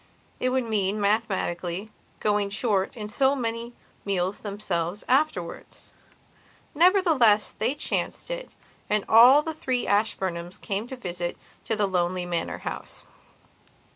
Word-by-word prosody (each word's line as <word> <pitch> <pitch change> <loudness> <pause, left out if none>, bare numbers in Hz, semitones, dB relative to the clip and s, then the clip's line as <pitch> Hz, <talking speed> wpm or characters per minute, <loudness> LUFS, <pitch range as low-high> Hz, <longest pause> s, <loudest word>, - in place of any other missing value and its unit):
It 255 - +1
would 260 0 +1
mean, 210 -2 0
mathematically, 200 -2 -1 0.3
going 205 -1 +1
short 205 +1 0
in 210 -2 -5
so 265 +6 +2
many 235 -1 -3 0.3
meals 190 -1 -1
themselves, 195 -3 -3
afterwards. 255 - -1 0.8
Nevertheless, 315 - +4
they 235 +6 -1
chanced 295 - -3
it, - - -5 0.4
and 210 -1 +1
all 250 +6 +8
the 320 - -3
three 255 -5 -1
Ashburnhams 190 -4 -1
came 200 +2 -3
on - - -15
a - - -6
visit 175 -5 -4 0.3
to 225 - 0
the 210 -1 +1
lonely 180 -1 0
manor 170 -2 -2
house. - - -6
210 Hz, 130 wpm, -26 LUFS, 190-250 Hz, 0.8 s, all